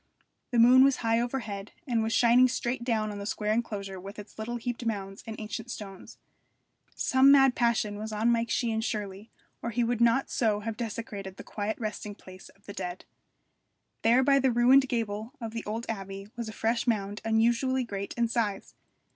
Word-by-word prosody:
The 245 Hz, -, -1 dB
moon 250 Hz, +3 st, +8 dB
was 275 Hz, -1 st, +4 dB
high 225 Hz, +1 st, +3 dB
overhead, 225 Hz, -5 st, -4 dB
and 240 Hz, -5 st, +1 dB
was 220 Hz, 0 st, -1 dB
shining 240 Hz, +2 st, +5 dB
straight 240 Hz, 0 st, -2 dB
down 220 Hz, -3 st, 0 dB
on 205 Hz, -, -6 dB
the 200 Hz, -, -6 dB
square 215 Hz, 0 st, -1 dB
enclosure 200 Hz, -4 st, -3 dB
with 200 Hz, +2 st, -9 dB
its 210 Hz, +1 st, -11 dB
little 230 Hz, +2 st, -3 dB
heaped 240 Hz, +1 st, -4 dB
mounds 195 Hz, -3 st, -4 dB
and 220 Hz, -1 st, -6 dB
ancient 220 Hz, +2 st, -6 dB
stones. 195 Hz, -5 st, -9 dB, 0.8 s
Some 265 Hz, +1 st, +5 dB
mad 270 Hz, -2 st, +6 dB
passion 225 Hz, -4 st, 0 dB
was 220 Hz, +1 st, -5 dB
on 220 Hz, +3 st, +2 dB
Mike 235 Hz, 0 st, +1 dB
Sheehan 225 Hz, -2 st, 0 dB
surely, 205 Hz, -1 st, -4 dB, 0.3 s
or 235 Hz, -, -3 dB
he 240 Hz, +1 st, 0 dB
would 235 Hz, 0 st, -1 dB
not 235 Hz, +3 st, +3 dB
so 215 Hz, -3 st, +1 dB
have 225 Hz, +1 st, -4 dB
desecrated 210 Hz, -4 st, -6 dB
the -, -, -8 dB
quiet 210 Hz, +1 st, -3 dB
resting 210 Hz, -2 st, -5 dB
place 185 Hz, -2 st, -13 dB
of 200 Hz, -, -24 dB
the 200 Hz, -, -8 dB
dead. 180 Hz, -2 st, -6 dB, 1.0 s
There 240 Hz, +3 st, +4 dB
by 275 Hz, +1 st, +4 dB
the 265 Hz, -1 st, +2 dB
ruined 255 Hz, +3 st, +5 dB
gable 225 Hz, 0 st, -3 dB
of 225 Hz, -3 st, -5 dB
the 230 Hz, 0 st, -5 dB
old 225 Hz, +3 st, -4 dB
abbey 195 Hz, -2 st, -6 dB
was 235 Hz, -2 st, -5 dB
a -, -, -5 dB
fresh 230 Hz, +3 st, -1 dB
mound 205 Hz, -2 st, -1 dB
unusually 235 Hz, +4 st, +2 dB
great 200 Hz, -4 st, -5 dB
in 235 Hz, -1 st, +1 dB
size. 220 Hz, -4 st, -2 dB
225 Hz, 190 wpm, -28 LUFS, 205-240 Hz, 1.0 s, moon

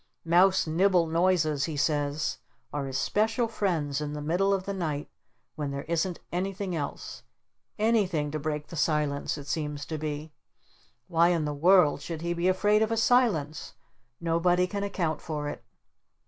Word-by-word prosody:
Mouse 185 Hz, +3 st, +4 dB
Nibble 175 Hz, +2 st, +3 dB
Noises 165 Hz, -3 st, +2 dB
he 160 Hz, -3 st, -4 dB
says 145 Hz, 0 st, 0 dB, 0.3 s
are 145 Hz, -2 st, -2 dB
his 135 Hz, 0 st, -3 dB
special 225 Hz, +3 st, +1 dB
friends 160 Hz, -10 st, -1 dB
in 150 Hz, 0 st, -3 dB
the 150 Hz, -, -5 dB
middle 180 Hz, +6 st, +1 dB
of 195 Hz, -1 st, +1 dB
the 200 Hz, -, -3 dB
night 155 Hz, -6 st, -3 dB, 0.4 s
when 150 Hz, -2 st, -3 dB
there 140 Hz, 0 st, -4 dB
isn't 170 Hz, +2 st, -1 dB
anything 190 Hz, +1 st, -2 dB
else. 145 Hz, -3 st, -5 dB, 0.6 s
ANYTHING 195 Hz, -9 st, +1 dB
to 155 Hz, -, -3 dB
break 150 Hz, 0 st, -3 dB
the -, -, -8 dB
silence 150 Hz, -2 st, 0 dB
it 145 Hz, -, -8 dB
seems 150 Hz, 0 st, -3 dB
to 155 Hz, -1 st, -4 dB
be! 150 Hz, 0 st, -5 dB, 0.7 s
Why 170 Hz, -1 st, +4 dB
in 170 Hz, -3 st, +1 dB
the 150 Hz, -, -2 dB
world 160 Hz, -1 st, +4 dB
should 165 Hz, +1 st, -6 dB
he 170 Hz, 0 st, 0 dB
be 170 Hz, +1 st, 0 dB
afraid 205 Hz, +3 st, +3 dB
of 220 Hz, 0 st, +1 dB
a 225 Hz, -, 0 dB
Silence? 220 Hz, -, +1 dB, 0.4 s
Nobody 170 Hz, +2 st, +2 dB
can 200 Hz, +2 st, -4 dB
account 170 Hz, -6 st, -2 dB
for 150 Hz, -2 st, -4 dB
it!" -, -, -8 dB
165 Hz, 165 wpm, -28 LUFS, 150-185 Hz, 0.7 s, Mouse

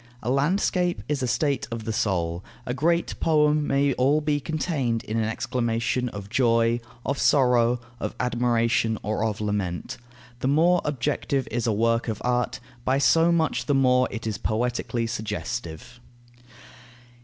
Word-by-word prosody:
A 120 Hz, -, 0 dB
landscape 175 Hz, +5 st, +1 dB
is 145 Hz, -2 st, -1 dB
a 130 Hz, -, 0 dB
state 140 Hz, +2 st, 0 dB
of 115 Hz, -1 st, -5 dB
the 110 Hz, 0 st, -3 dB
soul; 90 Hz, -5 st, -1 dB, 0.2 s
a 125 Hz, -, -2 dB
great 170 Hz, +5 st, 0 dB
poem 150 Hz, -1 st, +3 dB
may 140 Hz, 0 st, +2 dB
all 135 Hz, +5 st, +2 dB
be 150 Hz, -1 st, 0 dB
contained 145 Hz, -7 st, -1 dB
in 110 Hz, -, -3 dB
an 110 Hz, -1 st, 0 dB
exclamation 120 Hz, +1 st, -1 dB
of 100 Hz, -3 st, -8 dB
joy, 115 Hz, 0 st, +2 dB, 0.3 s
of 140 Hz, -, -1 dB
sorrow, 125 Hz, -3 st, +3 dB, 0.2 s
of -, -, -4 dB
admiration, 120 Hz, -2 st, +1 dB
or 110 Hz, +1 st, -1 dB
of 110 Hz, -2 st, -1 dB
lament. 105 Hz, -4 st, -3 dB, 0.4 s
The 130 Hz, -, -1 dB
more 170 Hz, +5 st, +4 dB
objective 140 Hz, -1 st, -1 dB
is 120 Hz, +1 st, -1 dB
a -, -, +3 dB
work 115 Hz, +3 st, +1 dB
of 110 Hz, -2 st, -3 dB
art, 125 Hz, 0 st, 0 dB, 0.2 s
by 130 Hz, +2 st, +2 dB
so 165 Hz, +5 st, +4 dB
much 160 Hz, -7 st, 0 dB
the 145 Hz, -, +2 dB
more 125 Hz, -1 st, +4 dB
is 115 Hz, -, -6 dB
it 110 Hz, -2 st, -3 dB
poetically 120 Hz, +1 st, -1 dB
suggestive. 115 Hz, -1 st, -5 dB
125 Hz, 155 wpm, -25 LUFS, 115-140 Hz, 0.4 s, more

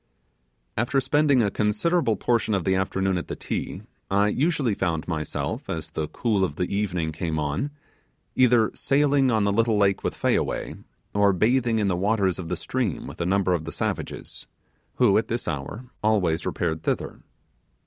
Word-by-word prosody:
After 120 Hz, +4 st, +2 dB
spending 140 Hz, -1 st, +3 dB
a 100 Hz, -, +1 dB
considerable 110 Hz, -, +1 dB
portion 115 Hz, 0 st, +1 dB
of 95 Hz, -, -1 dB
the 95 Hz, -, +2 dB
afternoon 95 Hz, 0 st, 0 dB
at -, -, -7 dB
the -, -, -4 dB
Ti, -, -, -4 dB, 0.3 s
I 100 Hz, +1 st, +3 dB
usually 140 Hz, -2 st, +1 dB
found 85 Hz, -5 st, -1 dB
myself, 80 Hz, -4 st, -3 dB
as 80 Hz, -1 st, -4 dB
the 80 Hz, -1 st, -2 dB
cool 105 Hz, -1 st, 0 dB
of 85 Hz, -6 st, -1 dB
the 90 Hz, +4 st, -2 dB
evening 90 Hz, -6 st, -1 dB
came 80 Hz, 0 st, -3 dB
on, 75 Hz, -, -1 dB, 0.7 s
either 120 Hz, -3 st, +4 dB
sailing 140 Hz, -1 st, +2 dB
on 110 Hz, -3 st, +2 dB
the 100 Hz, -, +2 dB
little 115 Hz, +1 st, +2 dB
lake 100 Hz, -2 st, +2 dB
with -, -, -2 dB
Fayaway, -, -, 0 dB, 0.4 s
or 100 Hz, -1 st, +4 dB
bathing 115 Hz, +4 st, +2 dB
in 105 Hz, -2 st, +1 dB
the 95 Hz, -, +1 dB
waters 95 Hz, -1 st, +1 dB
of 85 Hz, -3 st, -6 dB
the 90 Hz, -, -2 dB
stream 115 Hz, -1 st, -2 dB
with -, -, -8 dB
a 85 Hz, -, 0 dB
number 95 Hz, -1 st, +2 dB
of 85 Hz, -3 st, -1 dB
the 80 Hz, -, -5 dB
savages, -, -, -4 dB, 0.5 s
who, 110 Hz, -6 st, +4 dB
at 110 Hz, -, -3 dB
this 120 Hz, +1 st, -3 dB
hour, 85 Hz, -, -4 dB, 0.2 s
always 95 Hz, -7 st, +1 dB
repaired 80 Hz, -2 st, -1 dB
thither. -, -, -2 dB
100 Hz, 175 wpm, -25 LUFS, 90-120 Hz, 0.7 s, either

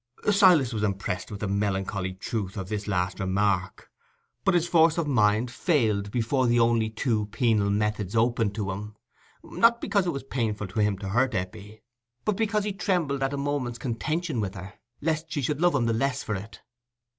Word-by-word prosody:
Silas 180 Hz, -, +5 dB
was 110 Hz, -, -2 dB
impressed 95 Hz, -3 st, -2 dB
with 105 Hz, -2 st, -7 dB
the 105 Hz, -, -1 dB
melancholy 95 Hz, -1 st, -1 dB
truth 95 Hz, +1 st, -4 dB
of 95 Hz, -1 st, -5 dB
this 105 Hz, -1 st, -3 dB
last 90 Hz, -2 st, -1 dB
remark; 95 Hz, -1 st, -1 dB, 0.5 s
but 195 Hz, -, +3 dB
his 175 Hz, -1 st, +2 dB
force 165 Hz, -1 st, +4 dB
of 170 Hz, -, +1 dB
mind 110 Hz, -3 st, +2 dB
failed 110 Hz, -, +1 dB
before 125 Hz, +4 st, +1 dB
the 120 Hz, 0 st, +3 dB
only 115 Hz, -1 st, +3 dB
two 110 Hz, -1 st, -1 dB
penal 110 Hz, -3 st, +1 dB
methods 105 Hz, -1 st, -1 dB
open 115 Hz, -1 st, +2 dB
to 100 Hz, -1 st, -3 dB
him, 105 Hz, +2 st, -7 dB, 0.5 s
not 230 Hz, +1 st, +4 dB
only -, -, -21 dB
because 200 Hz, -5 st, 0 dB
it -, -, +1 dB
was 140 Hz, -3 st, -5 dB
painful 110 Hz, -6 st, -2 dB
to 95 Hz, +3 st, -5 dB
him 105 Hz, -2 st, +1 dB
to 95 Hz, 0 st, -6 dB
hurt 125 Hz, +5 st, +1 dB
Eppie, 105 Hz, +3 st, -6 dB, 0.4 s
but 210 Hz, -, +1 dB
because 215 Hz, 0 st, 0 dB
he 205 Hz, -1 st, -2 dB
trembled 175 Hz, -9 st, -1 dB
at 135 Hz, 0 st, 0 dB
a 140 Hz, -, -3 dB
moment's 140 Hz, -4 st, -2 dB
contention 150 Hz, +4 st, -2 dB
with 95 Hz, -2 st, -4 dB
her, 95 Hz, +1 st, -8 dB, 0.3 s
lest 155 Hz, 0 st, -1 dB
she 150 Hz, -2 st, -1 dB
should 150 Hz, +3 st, -1 dB
love 175 Hz, -3 st, +4 dB
him 125 Hz, -4 st, +2 dB
the 115 Hz, -, +1 dB
less 135 Hz, +3 st, 0 dB
for 105 Hz, -, -3 dB
it. 100 Hz, +3 st, -7 dB
115 Hz, 195 wpm, -26 LUFS, 100-145 Hz, 0.5 s, Silas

